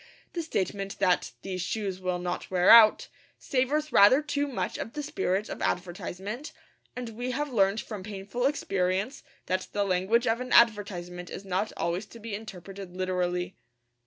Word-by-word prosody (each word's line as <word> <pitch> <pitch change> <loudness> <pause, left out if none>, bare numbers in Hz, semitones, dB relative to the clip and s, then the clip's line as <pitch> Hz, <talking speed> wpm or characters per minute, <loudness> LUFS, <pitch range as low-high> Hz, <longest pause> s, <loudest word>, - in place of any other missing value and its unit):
The 345 - -2
statement 195 - -3
that 185 -2 +2
'these 185 -2 -4
shoes 195 0 -3
will 180 -1 -1
not 175 0 -4
wear 180 0 +5
out' 225 -2 +8 0.3
savours 290 +4 0
rather 255 +9 +7
too 290 -1 -1
much 265 - -3
of 225 - -5
the 295 - -4
spirit 200 -5 -1
of - - -7
advertisement; 190 - -3 0.4
and 250 -2 -5
we 245 +3 -4
have 280 +2 -2
learned 200 0 +3
from 210 -4 -7
painful 205 +5 -2
experience 195 -3 -1 0.2
that 185 0 -1
the 205 - +1
language 195 +5 +2
of 225 +2 +1
an 255 - -3
advertisement 180 -6 +2
is 195 - -7
not 190 +3 -1
always 175 +4 -2
to 230 - -13
be 225 -1 -7
interpreted 195 -3 -8
literally. 180 -1 -1
200 Hz, 160 wpm, -28 LUFS, 185-235 Hz, 0.4 s, out